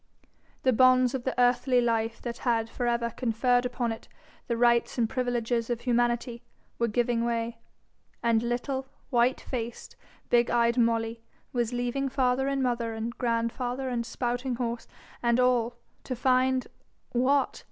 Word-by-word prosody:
The 255 - +4
bonds 255 +1 +5
of 260 -2 -3
the 260 - -2
earthly 250 +1 +3
life 230 -1 0
that 235 -1 -5
had 230 -2 0
for 245 - -2
ever 235 0 0
conferred 245 +1 +1
upon 245 -1 -2
it 225 - -7 0.4
the 235 - -1
rights 235 +1 +3
and 235 -2 +2
privileges 240 -1 -1
of 240 -1 -2
humanity 240 -1 0 0.4
were 235 - +2
giving 235 +1 +1
way, 230 0 -2 0.6
and 230 -1 +3
little, 260 +3 -2 0.2
white 245 +1 +3
faced, 240 -2 -6 0.4
big 240 -1 +4
eyed 235 0 +3
Molly 230 0 +1 0.3
was 240 -2 0
leaving 245 +3 -1
father 260 0 +1
and 275 -1 0
mother 235 -2 -1
and 230 +2 -4
grandfather 245 +2 -1
and 240 -2 -1
spouting 245 +2 -2
horse 235 -1 -3 0.3
and 235 0 +2
all, 245 -2 +2 0.3
to 255 - -3
find 255 +1 +2 0.5
what? 270 +3 +2
240 Hz, 150 wpm, -28 LUFS, 235-255 Hz, 0.6 s, bonds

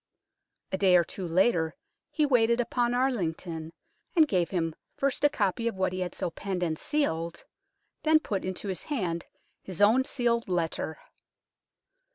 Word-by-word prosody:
A 190 - -1
day 185 -2 +6
or 175 - +4
two 180 +2 -5
later 170 -2 +2 0.3
he 305 - +1
waited 235 -3 +3
upon 240 0 +1
Arlington, 170 -10 -1 0.4
and 320 -3 +6
gave 180 - +1
him 165 -4 -1 0.2
first 275 0 0
a 290 - +7
copy 230 -4 0
of 230 - -1
what 190 -1 0
he 185 - -3
had 180 -1 -3
so 170 - -2
penned 185 0 -3
and 160 -2 -1
sealed, 170 - -1 0.6
then 315 0 +5
put 200 -10 -3
into 185 +2 -4
his 185 -3 -4
hand 180 - -2 0.4
his 185 -3 -8
own 220 +6 +5
sealed 235 -5 0
letter. 165 -2 -1
190 Hz, 160 wpm, -28 LUFS, 170-245 Hz, 0.6 s, a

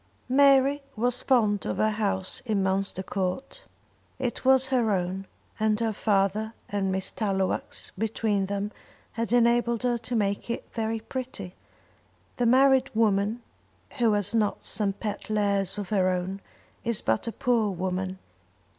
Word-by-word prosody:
Mary 275 +1 +5
was 245 +2 +1
fond 215 -6 +2
of - - -3
her 215 0 +2
house 200 -3 -1
in 205 -3 +1
Munster 190 0 0
Court. 195 - -3 0.5
It 250 -2 -3
was 265 0 +4
her 245 -4 +2
own; 190 0 -2 0.3
and 215 0 +2
her 225 -1 0
father 210 +2 0
and 195 -2 -1
Miss 190 0 -2
Tallowax 195 -3 -2
between 210 -1 0
them 200 +1 -2 0.4
had 230 0 -3
enabled 235 -1 +3
her 240 -1 +1
to 240 +2 -4
make 200 0 -1
it 235 - -3
very 225 0 -2
pretty. 235 -7 -6 0.8
The 245 - +2
married 265 +1 +5
woman 215 +1 +1 0.6
who 230 -3 +4
has 205 0 +2
not 215 -3 0
some 205 -3 0
pet 210 +1 -5
lares 200 -3 +1
of 200 -3 -5
her 190 -3 +2
own 185 +2 -2 0.4
is 230 -3 +1
but 110 - 0
a - - -1
poor 230 -3 +1
woman. 185 0 -3
215 Hz, 145 wpm, -27 LUFS, 195-235 Hz, 0.8 s, Mary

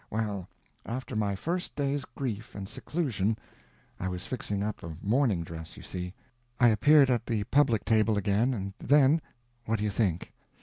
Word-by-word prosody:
Well, 105 -4 -2 0.3
after 125 +1 -5
my 105 -2 +1
first 175 - -3
day's 140 -1 -1
grief 115 -4 -5
and 95 -1 -5
seclusion—I 105 - -4
was 90 0 -4
fixing 105 -5 -3
up 105 0 -3
a 80 -2 -7
mourning 110 -4 +2
dress 80 -1 -8
you - - -10
see—I 120 +7 -2
appeared 135 +5 +6
at 120 -2 0
the 110 -3 0
public 125 -4 +3
table 110 -1 +3
again, 100 +5 +2
and 100 -2 -4
then—what 120 -5 +1
do 105 - -3
you 105 - 0
think? 95 -5 -1
110 Hz, 150 wpm, -29 LUFS, 100-125 Hz, 0.3 s, appeared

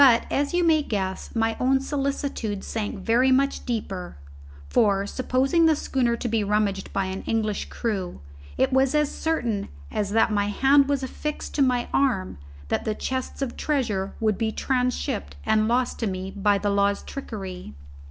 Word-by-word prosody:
But, 245 -4 +6
as 285 0 +1
you 350 0 +2
may 320 -2 +4
guess, 195 -7 -3
my 225 0 +1
own 265 +1 +3
solicitude 275 -7 -2
sank 215 -1 -3
very 235 +7 +3
much 275 +2 +1
deeper; 195 - -4 0.5
for, 195 - +3
supposing 265 +8 +2
the 315 - +4
schooner 245 -4 0
to 235 - -4
be 225 -2 +1
rummaged 205 -1 0
by 195 -1 0
an 190 +1 -4
English 215 -2 0
crew, 195 -6 -3 0.4
it - - +2
was 265 +2 +3
as 300 -1 +2
certain 240 -11 -1 0.2
as 205 -2 -1
that 225 +1 +3
my 205 -1 +1
hand 275 +6 +4
was 280 -2 0
affixed 300 +3 -4
to 290 - 0
my 250 -2 +2
arm 215 - +1 0.3
that - - 0
the 215 - -1
chests 260 +3 -3
of 250 - -4
treasure 225 -10 -1
would 215 -2 +1
be 225 -1 +1
transhipped 250 - -1
and 215 0 +3
lost 245 +2 +1
to 230 - 0
me 190 0 -4
by 205 0 +2
the 205 0 0
law's 200 0 +2
trickery. 190 - -7
225 Hz, 170 wpm, -25 LUFS, 200-270 Hz, 0.5 s, But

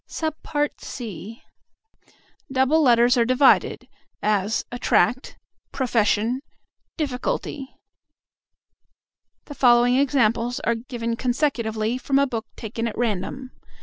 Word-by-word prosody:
(c) 260 - -4 1.1
Double 265 +4 +3
letters 240 -2 +4
are 235 - +4
divided; 255 +3 +3 0.4
as 210 0 0
"at 245 0 -7
tract," 260 +2 +1 0.3
"profes 235 -5 +1
sion," 230 +6 0 0.6
"dif 300 -5 -1
ficulty." 270 - -3 1.8
The 290 - -9
following 245 -1 +4
examples 245 -3 +1
are 235 - +1
given 230 0 -4
consecutively 240 -3 -1
from 275 +1 0
a 280 - +4
book 230 -4 -5
taken 230 +1 -4
at 220 - -6
random. 240 +3 -3
245 Hz, 105 wpm, -23 LUFS, 230-270 Hz, 1.8 s, letters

